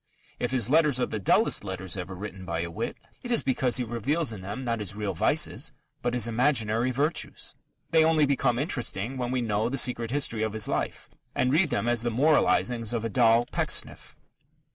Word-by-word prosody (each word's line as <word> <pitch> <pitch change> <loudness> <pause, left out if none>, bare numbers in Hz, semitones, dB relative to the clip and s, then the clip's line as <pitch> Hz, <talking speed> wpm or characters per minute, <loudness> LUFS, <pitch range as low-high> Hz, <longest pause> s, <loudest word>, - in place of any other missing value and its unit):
If - - -1
his 125 -4 +1
letters 150 -2 +4
are - - +2
the 110 - -4
dullest 95 - +2
letters 95 -2 -4
ever 95 0 -6
written 95 0 -7
by 85 -2 -3
a 85 0 -4
wit, - - -4 0.2
it 245 - -7
is 235 - +2
because 130 -2 +1
he 125 - 0
reveals 120 +5 -1
in 100 - -8
them 105 +7 -6
not 115 -1 -1
his 100 -1 -4
real 105 -2 -2
vices 80 - +1 0.3
but 120 0 -1
his 120 -1 +1
imaginary 115 -1 +1
virtues. 145 +6 -1 0.4
They 160 -1 +5
only 160 -1 +4
become 135 -3 +1
interesting 125 - -1
when 125 -2 -2
we 130 0 0
know 110 0 0
the 135 - -2
secret 120 -2 +1
history 125 -4 -1
of 110 -1 -1
his 110 -1 -1
life - - -3 0.3
and 125 +1 +1
read 160 +1 +3
them 120 - -1
as 120 -1 +1
the 120 - 0
moralizings 120 -3 +2
of 115 -1 -2
a - - -1
doll 115 0 +4
Pecksniff. - - -1
120 Hz, 205 wpm, -27 LUFS, 105-130 Hz, 0.4 s, They